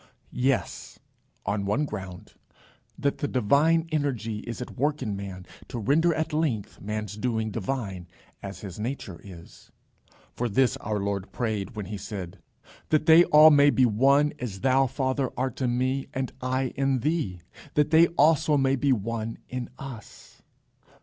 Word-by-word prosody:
Yes; 130 +1 -1 0.5
on 100 -1 -1
one 105 +10 0
ground: 95 -7 -8 0.6
that 140 -1 -1
the 145 - -1
divine 145 +7 +2
energy 120 -8 -1
is 120 +1 -7
at 125 - -7
work 145 +2 0
in 105 -4 -2
man, 95 -2 -7 0.2
to - - -6
render 145 +10 +3
at 155 -1 -2
length 145 -10 -2
man's 105 -1 -4
doing 110 -1 -1
divine 100 -5 -4 0.3
as 100 0 -8
his 100 -1 -8
nature 105 -6 -5
is. 85 -4 -13 0.6
For 120 0 -2
this 130 +3 +2
our 105 -1 -3
Lord 100 -1 -3
prayed 110 -1 -3
when 105 -2 -4
he 105 +2 -5
said: 95 -2 -7 0.5
"That 155 0 +2
they 165 +1 +8
all 155 +1 +8
may 145 0 +6
be 130 -2 +4
one, 135 +6 +3
as 100 -6 -5
thou, 135 +2 +3
Father, 130 0 -1
art 130 0 -2
in 125 -1 +1
me, 130 +2 -1
and 130 -1 -2
I 130 0 0
in 135 -2 +1
thee, 140 - -1 0.3
that 150 +1 +2
they 165 +1 +7
also 155 0 +4
may 135 0 +2
be 135 +1 +1
one 115 0 -2
in 125 -1 -4
us." 130 -6 -11
125 Hz, 160 wpm, -26 LUFS, 105-140 Hz, 0.6 s, they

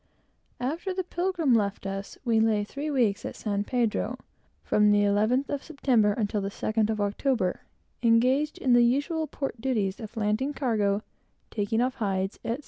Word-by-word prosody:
After 325 +9 -3
the 375 - -1
Pilgrim 345 -5 0
left 200 -3 0
us, 195 0 -5
we 230 -2 +3
lay 220 -2 +2
three 280 +8 -5
weeks 235 -8 +1
at - - -5
San 205 -2 -2
Pedro, 235 +1 -1 0.5
from 210 0 +3
the 205 0 +4
11th 215 +7 +2
of 285 -1 -2
September 250 -9 +2
until 210 -1 -1
the 195 - -2
2nd 215 +1 -1
of 215 -1 -1
October, 205 -1 0 0.4
engaged 255 +6 +3
in 255 - +2
the 240 - +6
usual 290 +6 +1
port 270 -4 -5
duties 215 -6 -1
of 225 0 -9
landing 220 +7 0
cargo, 210 -6 0 0.5
taking 220 +2 0
off 255 +1 +1
hides, 195 -3 -2
etc. 230 +4 -2
230 Hz, 165 wpm, -27 LUFS, 205-265 Hz, 0.5 s, the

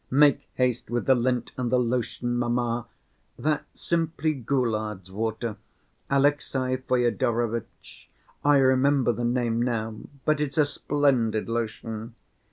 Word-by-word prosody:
"Make 145 +1 +4
haste 125 -2 0
with 120 +1 -1
the 135 - +6
lint 125 -1 0
and 120 -2 -1
the 130 - +4
lotion, 120 0 -1
mamma. 120 -1 0 0.5
That's 150 0 -2
simply 165 -2 0
Goulard's 110 - -2
water, 110 +2 -3 0.5
Alexey 135 -2 +1
Fyodorovitch, 120 -2 -1 0.3
I 145 0 +5
remember 130 -1 +4
the 120 +1 -3
name 120 -1 +1
now, 115 -3 -1 0.3
but 155 -1 +2
it's 145 -1 -2
a 150 - +5
splendid 130 -7 +1
lotion. 115 0 -4
120 Hz, 120 wpm, -26 LUFS, 115-135 Hz, 0.5 s, the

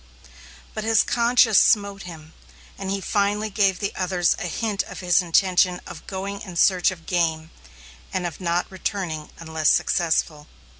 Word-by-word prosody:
But 215 - -4
his 225 -1 +3
conscience 235 -3 +4
smote 200 -2 +2
him, 160 -3 -11 0.4
and 195 -1 -6
he 195 0 -2
finally 205 +2 0
gave 195 -2 +2
the 200 - -3
others 180 -1 +1
a - - -3
hint 205 +3 -2
of - - -9
his 180 0 +3
intention 180 +1 +2
of - - -11
going 195 +1 -5
in 185 -3 -9
search 180 +1 +3
of 170 -4 -9
game, 165 -2 -1 0.6
and 185 -2 -2
of 170 +1 -6
not 175 0 0
returning 180 -5 -4
unless 160 -2 0
successful. 160 -3 0
185 Hz, 155 wpm, -23 LUFS, 170-200 Hz, 0.6 s, conscience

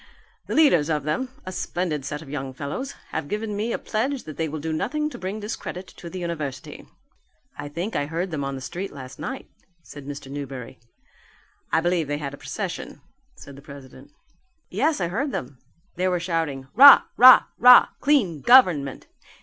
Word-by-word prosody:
The - - -3
leaders 175 - +4
of 150 -3 -1
them 250 - -2 0.2
a 185 - -5
splendid 175 -6 -3
set 150 +2 -5
of 140 - -14
young 135 -2 -5
fellows 150 - -5 0.2
have 160 -2 -4
given 210 +3 -4
me 215 +3 -2
a - - -1
pledge 255 +5 -2
that 155 - -9
they 160 -1 -2
will 155 +1 -5
do 160 +2 -4
nothing 300 - -2
to - - -8
bring 190 +4 -5
discredit 205 -3 -7
on 170 - -6
the 185 - -8
university." 155 -7 -6 0.7
"I 145 0 -7
think 175 +9 -5
I 145 - -1
heard 170 +4 -3
them 150 -3 -3
on 135 0 -4
the 130 - -7
street 185 +8 -6
last 135 -2 -11
night," 265 +1 -6 0.4
said 145 -2 -12
Mr. 140 -1 -8
Newberry. 135 -4 -7 0.9
"I 160 - +2
believe 175 -2 0
they 145 0 -2
had 140 -2 -6
a - - -9
procession," 170 +7 -6 0.4
said 140 - -12
the 140 - -13
president. 140 -2 -13 0.6
"Yes, 310 +2 0
I 175 - -1
heard 265 - -2
them; 130 - -6 0.4
they 185 +1 +1
were 180 -1 0
shouting 165 -6 -3
'Rah! 280 +5 +9
rah! 255 +1 +9 0.2
rah! 250 0 +8
Clean 220 - +1
Government! 175 - +4
165 Hz, 185 wpm, -24 LUFS, 145-210 Hz, 0.9 s, Rah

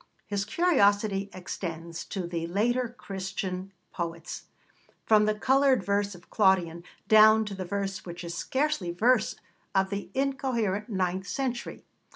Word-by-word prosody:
His 200 -1 -2
curiosity 205 - +2
extends 170 -2 -6
to 190 -3 -4
the 170 -1 -3
later 235 +7 +1
Christian 190 -1 -5 0.2
poets 170 -1 -5 0.6
from 215 -1 +5
the 215 0 +1
coloured 265 +3 +3
verse 200 -1 0
of 175 - -17
Claudian 180 -5 +2 0.2
down 215 0 +7
to 210 - -5
the 190 -1 -5
verse 195 +1 -3
which 175 0 -8
is 170 0 -5
scarcely 265 - -1
verse 220 +6 +2 0.4
of 190 0 +2
the 200 0 -4
incoherent 255 -6 -1
ninth 190 -1 -1
century. 250 +3 -3
200 Hz, 135 wpm, -28 LUFS, 180-220 Hz, 0.6 s, down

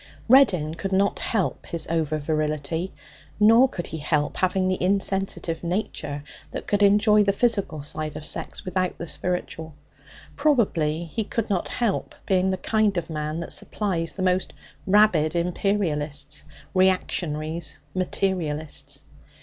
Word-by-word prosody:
Reddin 195 - +5
could 195 +4 -4
not 200 +1 +2
help 205 -6 -1
his 165 -2 0
over 160 -2 0
virility, 155 +3 -2 0.5
nor 225 +5 +6
could 175 - -5
he 160 - -6
help 150 0 0
having 185 0 +1
the 185 0 -1
insensitive 190 -3 0
nature 155 -5 -3 0.3
that - - -6
could 205 0 0
enjoy 210 +1 +5
the 200 - +3
physical 200 -8 +1
side 155 0 -3
of 155 - -8
sex - - -3
without 185 0 -1
the 170 - -5
spiritual; 165 -2 -3 0.6
probably 185 - +2
he 220 +7 -3
could 210 +1 -3
not 185 -3 0
help 230 -5 -1
being 190 -1 +2
the 190 - 0
kind 215 0 +1
of 170 -1 -3
man 155 +1 -3
that 170 - -2
supplies 175 -6 -2
the 190 - -3
most 185 0 +1 0.3
rabid 185 -6 +4
imperialists, 170 -5 -1 0.3
reactionaries, 165 -4 0 0.2
materialists. 175 -5 -2
180 Hz, 135 wpm, -25 LUFS, 155-200 Hz, 0.6 s, nor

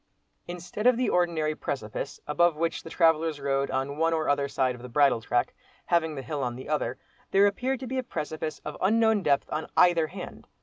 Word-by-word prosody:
Instead 180 +6 -3
of 250 -2 +5
the 250 - +1
ordinary 165 -3 +1
precipice, 130 -8 -5
above 170 +2 +2
which 165 +2 -1
the - - -10
travellers 160 -2 +2
rode, 140 0 0
on 135 +2 -2
one 165 0 +2
or 160 -1 0
other 140 -1 +2
side 130 -2 0
of 120 - -11
the 125 - -9
bridle 140 -2 +3
track, 120 +1 0 0.3
having 160 -3 +1
the 135 - -5
hill 145 +2 -4
on 120 -2 -2
the 130 - -9
other, 150 0 -1 0.3
there 195 +1 +5
appeared 250 +6 0
to 260 - -6
be 260 +1 -2
a - - -2
precipice 155 -6 -4
of 150 - -5
unknown 220 +1 +3
depth 140 -5 +2
on 155 - -3
either 170 -3 +5
hand. - - -9
155 Hz, 210 wpm, -27 LUFS, 140-175 Hz, 0.3 s, of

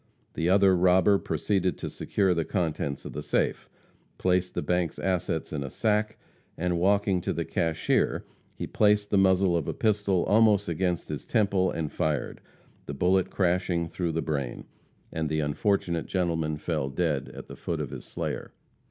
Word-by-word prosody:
The 80 +2 0
other 95 0 +5
robber 95 +3 +4
proceeded 90 +3 -1
to - - -5
secure 95 -3 0
the 85 -1 0
contents 80 -6 -2
of - - -7
the - - -4
safe, - - -1 0.5
placed 90 0 +1
the - - -1
bank's 90 +1 0
assets 90 -4 -1
in 70 -2 -2
a 70 - -5
sack, 105 +5 0 0.4
and 90 0 0
walking 100 0 +2
to - - -2
the - - -2
cashier, 80 -1 0 0.3
he - - -4
placed 105 -1 +2
the 100 - +4
muzzle 95 -1 +4
of 85 -3 -1
a - - -2
pistol 105 -4 +1
almost 105 -2 +4
against 85 +1 -1
his 75 -2 -4
temple, 100 -5 +2
and 80 -2 -3
fired, 75 -3 -2 0.5
the 70 - -5
bullet 90 +5 +2
crashing 90 -2 0
through 85 0 -3
the 80 - -1
brain, 70 -6 -3 0.5
and 80 -1 -2
the 80 0 0
unfortunate 85 +3 0
gentleman 80 -4 -1
fell 75 -3 -2
dead 75 -1 -1
at - - -8
the - - -9
foot 85 -2 -4
of 75 -5 -4
his - - -7
slayer. - - -5
90 Hz, 170 wpm, -27 LUFS, 80-95 Hz, 0.5 s, other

